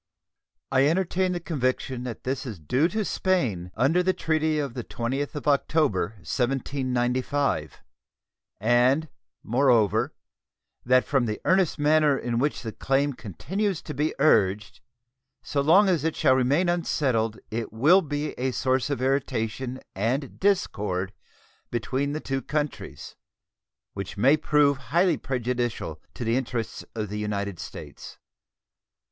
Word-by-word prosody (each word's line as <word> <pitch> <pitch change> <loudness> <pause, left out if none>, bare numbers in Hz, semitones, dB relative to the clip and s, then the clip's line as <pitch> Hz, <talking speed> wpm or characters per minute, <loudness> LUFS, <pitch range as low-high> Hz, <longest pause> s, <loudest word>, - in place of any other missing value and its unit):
I 135 +1 +4
entertain 185 +2 +1
the 175 - -2
conviction 130 -5 -2
that 120 -3 -6
this 130 +1 -2
is 115 -7 -6
due 125 - +1
to 215 +4 -2
Spain 120 - 0
under 160 +8 +3
the 185 +1 +2
treaty 155 -1 0
of 140 -5 -2
the 125 - -5
20th 135 +7 -3
of 150 - -5
October, 140 - +1
1795, 130 - -1 0.8
and, 125 +8 +3 0.3
moreover, 120 -4 +2 0.7
that 125 +1 +4
from 135 -4 +1
the 105 - -3
earnest 185 -3 +3
manner 150 -1 +3
in 120 -2 -2
which 145 +1 -1
the 110 - -4
claim 135 +5 0
continues 190 - -3
to 150 - -6
be 150 +3 -1
urged 105 -8 +2 0.6
so 140 - -1
long 180 +8 +5
as 175 -6 +2
it 160 0 0
shall 130 - +4
remain 135 +7 +2
unsettled 130 -10 0
it 115 0 -3
will 150 - +5
be 150 -2 -3
a 130 +1 +1
source 130 +1 0
of 140 -3 -2
irritation 130 -1 -1
and 125 +8 -2
discord 105 - 0 0.6
between 130 +4 -1
the 155 - -2
two 135 -3 -3
countries, 135 - -4 0.8
which 100 +1 -6
may 130 +8 +5
prove 150 -2 +3
highly 175 +4 +3
prejudicial 120 - -3
to - - -5
the 115 +1 +1
interests 115 -4 -3
of 105 -3 -3
the 105 +1 -4
United 100 -3 -3
States. - - -9
130 Hz, 135 wpm, -26 LUFS, 115-150 Hz, 0.8 s, long